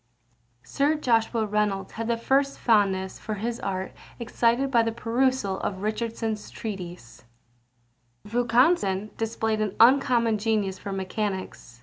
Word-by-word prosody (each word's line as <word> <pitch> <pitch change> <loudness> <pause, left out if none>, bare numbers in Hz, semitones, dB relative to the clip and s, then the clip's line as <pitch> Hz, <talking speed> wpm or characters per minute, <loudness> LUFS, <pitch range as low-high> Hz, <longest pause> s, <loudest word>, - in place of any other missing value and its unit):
Sir 290 +3 +1
Joshua 230 -5 +1
Reynolds 210 -2 -1
had 230 0 -5
the 235 0 +1
first 275 +4 +1
fondness 195 -4 +1
for 215 - -4
his 230 +3 -3
art 190 -1 -3 0.3
excited 240 +2 +1
by 235 -3 +5
the 225 0 0
perusal 235 -3 0
of 190 -1 -4
Richardson's 220 0 -3
Treatise. 180 - -8 1.0
Vaucanson 230 - +2
displayed 220 -1 -1
an 210 -3 -2
uncommon 235 -2 +4
genius 205 -3 0
for 200 - -6
mechanics. 190 - -4
220 Hz, 120 wpm, -26 LUFS, 200-235 Hz, 1.0 s, by